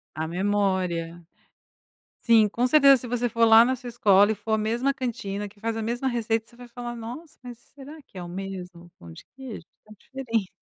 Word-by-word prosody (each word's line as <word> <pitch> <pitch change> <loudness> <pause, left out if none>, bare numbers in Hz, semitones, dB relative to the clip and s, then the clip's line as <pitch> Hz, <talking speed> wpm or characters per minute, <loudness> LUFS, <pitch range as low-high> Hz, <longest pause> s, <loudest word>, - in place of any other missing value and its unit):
A 160 +1 -3
memória. 180 -2 -1 1.0
Sim, 225 -3 +4
com 240 +4 0
certeza 275 0 +6
se 245 - -8
você 245 0 -1
for 230 0 +2
lá 225 +1 +8
na 260 +2 +1
sua 250 -1 -9
escola 205 -4 +4
e 220 - +1
for 215 +2 -6
a 220 - +3
mesma 235 +6 0
cantina 210 -6 -4
que 205 +1 -22
faz 225 +1 -3
a 225 - -3
mesma 240 +4 -3
receita, 225 -2 -1
você 240 - -20
vai 245 0 -12
falar: 240 0 -7
"Nossa, 240 +8 -9
mas 245 -2 -10 0.2
será 290 +3 -11
que 195 - -14
é 180 - -6
o 175 - -8
mesmo 180 -2 -8
pão 85 -1 -13
de - - -13
queijo?" 255 -10 -9 0.2
"Está 215 - -18
diferente". 230 -7 -3
225 Hz, 210 wpm, -25 LUFS, 195-245 Hz, 1.0 s, lá